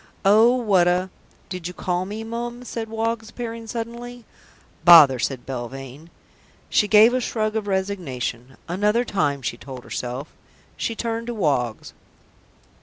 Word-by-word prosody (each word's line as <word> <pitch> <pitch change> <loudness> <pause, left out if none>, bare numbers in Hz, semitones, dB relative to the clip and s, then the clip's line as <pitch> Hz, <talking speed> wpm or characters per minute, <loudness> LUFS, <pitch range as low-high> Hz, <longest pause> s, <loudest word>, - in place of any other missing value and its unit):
"Oh, 220 +5 +6
what 200 -8 +3
a 180 +1 +1 0.2
" - - -32
"Did 180 -2 -5
you 180 - -8
call 180 0 -1
me, 215 +2 -5
Mum?" 240 +2 -5
said 225 -2 -5
Woggs, 225 0 -2
appearing 230 -1 -6
suddenly. 235 +1 -6 0.6
"Bother!" 155 -7 +9
said 125 0 -2
Belvane. 135 +4 -7 0.6
She 210 - +3
gave 220 +3 +7
a 255 - +1
shrug 215 -2 -2
of 215 -2 -2
resignation. 140 -11 -3
"Another 210 +7 +1
time," 145 - -1
she 120 - -3
told 130 0 -9
herself. 125 +4 -5 0.4
She 230 - -3
turned 230 0 -3
to 240 - -3
Woggs. 130 - -1
200 Hz, 145 wpm, -23 LUFS, 140-230 Hz, 0.6 s, Bother